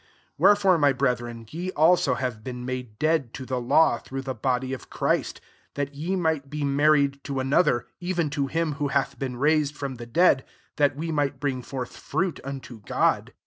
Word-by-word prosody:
4 - - +6
Wherefore, 205 -3 +5
my 145 -2 +4
brethren, 120 -3 -1
ye 175 +3 -4
also 160 -3 +4
have 125 -5 -3
been 125 0 -6
made 125 -4 -5
dead 155 -5 0
to 130 - -6
the 130 -1 -2
law, 125 +1 +4
through 135 0 -6
the 130 -1 -3
body 130 +2 -1
of 130 - -8
Christ; - - -1 0.4
that 145 0 -2
ye 165 +7 -2
might 160 -6 0
be 150 +1 -3
mar 140 +2 +3
ried 140 -1 +1
to 140 -2 -2
another, 130 -2 +2
even 175 -4 -1
to 140 -2 -1
him 165 +2 0
who 145 - +2
hath 140 0 -1
been 130 -2 -3
raised 150 +1 +2
from 135 -3 -4
the 120 0 -8
dead, 150 0 +4 0.3
that 145 -2 +3
we 165 +3 -3
might 145 -3 0
bring 135 -3 -1
forth 125 -1 -6
fruit 185 -5 -2
unto 130 -3 -7
God. - - +1
140 Hz, 195 wpm, -25 LUFS, 130-155 Hz, 0.4 s, 4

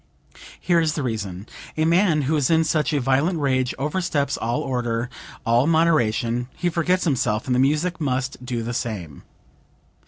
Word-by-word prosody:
Here 175 -2 +2
is 160 -2 +1
the 150 - -3
reason: 100 -6 -4 0.3
a 155 - +2
man 170 -2 +3
who 150 +4 +1
is 145 -4 +1
in 160 -1 +4
such 155 -1 +1
a 145 - +1
violent 140 +7 +1
rage 130 -4 0
oversteps 150 0 -1
all 120 +1 -1
order, 120 -2 -2 0.3
all 120 +4 +3
moderation; 125 -8 +2
he 175 - 0
forgets 180 +2 +1
himself, 120 -8 0
and 130 - 0
the 125 - +2
music 155 +6 +1
must 130 -2 -2
do 120 -2 -3
the 120 +2 -4
same. 100 - -4
135 Hz, 165 wpm, -23 LUFS, 120-160 Hz, 0.3 s, in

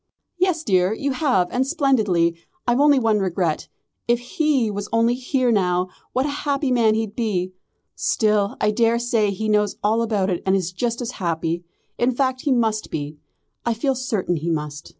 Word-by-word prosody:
"Yes, 360 -3 +1
dear, 185 -1 +2
you 280 +4 -2
have, 255 - +1
and 260 +2 0
splendidly! 205 - +2 0.3
I've 240 +1 +2
only 290 -1 +5
one 225 -4 +2
regret. 180 -4 -1 0.4
If 240 0 +3
he 250 -1 0
was 205 0 -5
only 230 +1 +3
here 255 0 0
now, 180 -3 +1 0.2
what 260 +2 0
a - - -1
happy 280 -2 0
man 225 -3 +3
he'd 220 -2 -2
be! 185 -6 -1 0.4
Still, 210 -2 +1
I 210 - +2
daresay 230 -1 +2
he 200 +2 -3
knows 210 -1 +2
all 220 +2 +2
about 205 -4 0
it 175 - -2
and 190 0 +2
is 180 -2 -1
just 235 +6 -2
as 240 - -4
happy. 170 0 -1 0.3
In 245 +2 +3
fact 260 0 0
he 285 - 0
must 225 -4 +1
be. 150 0 -5 0.4
I 235 -1 0
feel 270 +4 0
certain 225 -9 -1
he 160 +3 -3
must. 150 -2 -4
220 Hz, 180 wpm, -22 LUFS, 185-250 Hz, 0.4 s, only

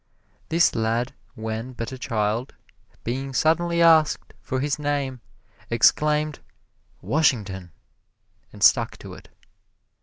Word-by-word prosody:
This 165 +1 +3
lad 115 +2 -1 0.2
when 110 +3 -5
but 115 0 -5
a 130 - -6
child, 110 +2 -2 0.5
being 135 +3 -4
suddenly 170 +3 +2
asked 160 -2 +4
for 130 - -3
his 145 +2 -1
name, 140 -4 -2 0.5
exclaimed, 150 +5 +2 0.6
"Washington," 105 - 0 0.8
and - - -6
stuck - - +4
to - - -10
it. - - -14
130 Hz, 110 wpm, -24 LUFS, 115-150 Hz, 0.8 s, asked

